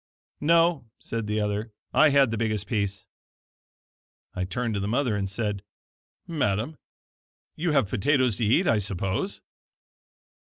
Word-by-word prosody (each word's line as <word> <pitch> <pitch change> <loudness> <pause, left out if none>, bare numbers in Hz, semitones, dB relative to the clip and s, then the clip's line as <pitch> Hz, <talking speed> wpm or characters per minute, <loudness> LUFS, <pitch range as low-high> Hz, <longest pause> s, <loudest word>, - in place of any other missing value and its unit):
"No," 165 -4 +3
said 115 -2 -4
the 105 +1 0
other, 105 +1 -2 0.2
"I 155 0 +6
had 140 -4 +4
the 115 - -1
biggest 110 -3 -1
piece." 100 -1 -2 1.3
I 90 0 -2
turned 115 +5 -2
to 100 - -1
the 100 - -2
mother, 120 0 +1
and 100 -1 -2
said: 105 -1 -2 0.6
"Madam, 135 - -1 0.8
you 165 0 0
have 135 -8 +3
potatoes 125 +1 +2
to 115 - 0
eat, 130 - +3
I 115 - +3
suppose?" 95 - -2
110 Hz, 140 wpm, -26 LUFS, 100-140 Hz, 1.3 s, I